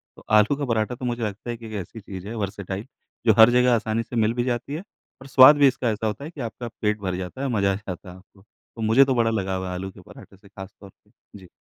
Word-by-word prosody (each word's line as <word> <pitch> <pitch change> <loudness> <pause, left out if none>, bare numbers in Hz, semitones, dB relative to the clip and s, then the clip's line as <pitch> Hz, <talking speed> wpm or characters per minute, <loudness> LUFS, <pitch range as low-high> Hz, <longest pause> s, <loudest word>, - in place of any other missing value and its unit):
तो - - -16
आलू 110 +5 +4
का 145 - -2
पराठा 115 0 -1
तो 125 - -7
मुझे 120 -1 -2
लगता 105 +3 -5
है 120 - -3
कि 115 - -12
एक 110 - -9
ऐसी 100 +5 -11
चीज़ 95 -1 -9
है, 115 - -6
वर्सेटाइल, 100 0 -5 0.4
जो 110 - +6
हर 110 +2 +9
जगह 125 0 +4
आसानी 110 0 -1
से 120 - -9
मिल 115 0 +2
भी 120 - -1
जाती 125 +3 -3
है 155 - -3 0.4
और 135 - -11
स्वाद 135 +2 +8
भी 145 -1 +6
इसका 130 -2 0
ऐसा 110 +1 -2
होता 110 +6 -4
है - - -6
कि 150 - -9
आपका 120 +1 -6
पेट 105 0 0
भर 95 -2 -2
जाता 95 +8 -6
है, 140 - -1
मज़ा 100 -5 +1
आ - - -1
जाता 95 -2 -8
है 90 - -11
आपको। 95 +1 -22
तो 115 +2 -16
मुझे 110 +5 +5
तो 130 -1 0
बड़ा 115 -1 +2
लगाव 95 -4 -2
है 90 - -4
आलू 95 +2 -5
के - - -15
पराठे 95 - -15
से 100 0 -20
खास 95 -1 -10
तौर 100 - -12
पे। 105 - -29 0.3
जी। 95 - -15
110 Hz, 285 wpm, -24 LUFS, 100-120 Hz, 0.4 s, हर